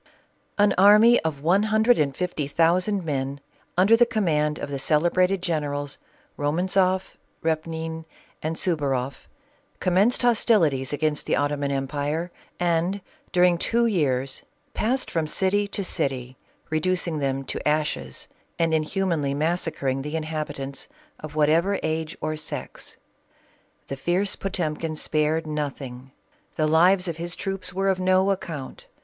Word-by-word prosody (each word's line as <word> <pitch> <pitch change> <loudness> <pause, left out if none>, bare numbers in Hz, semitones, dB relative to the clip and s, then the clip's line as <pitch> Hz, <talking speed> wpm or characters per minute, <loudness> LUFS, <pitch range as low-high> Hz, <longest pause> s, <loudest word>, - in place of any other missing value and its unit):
An 205 -1 +4
army 210 +5 +7
of 150 -3 -4
one 180 +5 +4
hundred 220 +3 +3
and 140 -2 0
fifty 175 -5 -2
thousand 180 +5 +2
men, 140 -2 -2 0.4
un 185 - +5
der 225 +3 +6
the 240 +1 +5
command 155 -10 +1
of 145 - -6
the 140 - -3
celebrated 180 +6 +2
generals, 145 -4 -2 0.4
Romantzoff, 185 +5 +1 0.3
Repnin, 160 0 -2 0.4
and 160 +1 -2
Suvaroff, 140 -7 -1 0.5
commenced 195 +8 +2
hostilities 195 - +3
against 150 0 -1
the - - +2
Ottoman 145 0 0
empire 145 +5 -2 0.3
and, 175 +3 0 0.3
during 180 -1 +4
two 235 +5 +2
years, 135 - 0 0.3
passed 255 +4 -1
from 160 -2 0
city 195 +5 +1
to 200 0 -3
city, 130 -7 -2 0.4
reducing 170 0 0
them 135 -1 -1
to - - -4
ashes 150 - -1 0.3
and 165 -1 +1
inhumanly 155 -3 0
massa 165 +3 0
cring 135 -2 -2
the 150 +3 -5
inhabitants, 150 -3 -4 0.3
of 155 -1 -9
whatever 165 +6 +3
age 160 0 -2
or 155 0 -1
sex. 155 - -6 0.9
The 135 - -4
fierce 180 +8 0
Potemkin 165 -4 -3
spared 155 +1 0
nothing. 135 -4 -5 0.5
The 155 - +1
lives 180 +4 +4
of 165 -2 -3
his 170 +1 -3
troops 195 -2 -4
were 195 +2 0
of 190 -1 +1
no 185 +1 +3
account. 160 -8 -5
160 Hz, 135 wpm, -24 LUFS, 145-185 Hz, 0.9 s, army